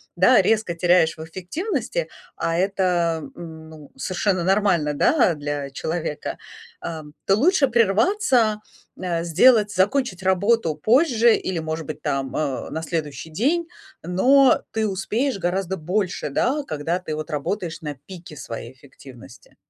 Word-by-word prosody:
да, - - +5
резко 215 -6 +1
теряешь 170 -1 +3
в 160 - -7
эффективности, 320 - -3 0.3
а 165 - -1
это, 180 -4 +1
м, 160 -2 -10
ну, 155 -3 -13
совершенно 185 +4 -1
нормально, 185 -5 +2
да, 190 - +3
для 145 -2 -4
человека, 160 +1 -4 0.4
а, 160 -2 -6 0.2
то 195 - +4
лучше 295 - +3
прерваться, 230 - +2 0.4
э, 175 -2 -2
сделать, 210 +5 +4
закончить 195 0 0
работу 190 -1 +2
позже 235 - +4
или, 185 -3 -3
может 160 0 -4
быть, 155 -1 -6
там, 135 -3 -2
э, 145 -4 -2
на 160 - -4
следующий 160 -3 -4
день, 290 - 0 0.4
но 255 +11 +4
ты 220 -1 0
успеешь 210 +6 -1
гораздо 185 +1 -1
больше, 185 +1 -2
да, 265 - 0
когда 165 - -2
ты, 180 -4 -6
вот, 155 +1 -6
работаешь 165 +3 -3
на 150 -2 -5
пике 175 -4 -11
своей 115 -2 -7
эффективности. 130 -2 -16
180 Hz, 135 wpm, -22 LUFS, 160-215 Hz, 0.4 s, да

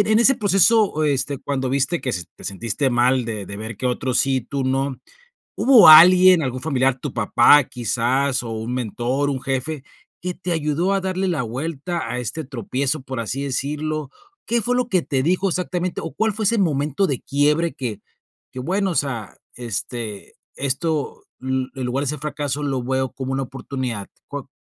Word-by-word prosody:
en 215 - +5
ese 265 +3 +5
proceso, 200 - +3
este, 140 -1 0
cuando 130 -2 -2
viste 140 +5 0
que 130 - -2
se 90 -2 -3
te - - -15
sentiste 115 +7 -1
mal 125 +1 +2
de 105 -4 -5
de 100 - -7
ver 110 0 -6
que 130 - -3
otros 125 0 0
sí, 135 -1 +2
y - - 0
tú 135 +1 -3
no, 135 0 -1 0.6
¿hubo 240 -9 +7
alguien, 180 +2 +9
algún 130 -1 -3
familiar, 135 -3 +1
tu - - -5
papá 145 -2 +5
quizás, 125 +3 0
o 115 - -5
un 110 +3 -4
mentor, 125 +4 -1
un 130 -1 -3
jefe, 135 +2 -2 0.4
que 180 0 -4
te 180 -1 -4
ayudó 160 +4 0
a 195 - +1
darle 190 0 -2
la 160 -7 0
vuelta 150 +4 -4
a 125 - -3
este 155 +7 -4
tropiezo, 130 +2 -2
por 130 -2 -6
así 130 +5 -3
decirlo? 150 +2 -3 0.4
¿Qué 235 -1 +1
fue 245 +4 0
lo 250 -1 0
que 185 -7 +2
te 135 -2 -1
dijo 185 +5 +1
exactamente?, 180 0 -2
o, 165 - -6
¿cuál 220 0 +1
fue 215 +2 -4
ese 230 - +3
momento 150 0 +1
de 135 -4 -2
quiebre 150 +4 +1
que 115 -6 -5 0.5
que 130 - -6
bueno, 190 +5 0
o - - -5
sea, 125 - -2 0.2
este, 115 -2 -5 0.2
esto, 145 +2 -2 0.2
mm, 130 0 -1
en 130 -2 -4
lugar 135 +3 -1
de - - -5
ese 150 +2 -2
fracaso 145 -1 -3
lo 135 -3 -1
veo 130 +1 -1
como 130 0 -5
una 135 0 -1
oportunidad? 130 -5 -5 0.2
¿Có - - -7
140 Hz, 190 wpm, -21 LUFS, 125-165 Hz, 0.6 s, alguien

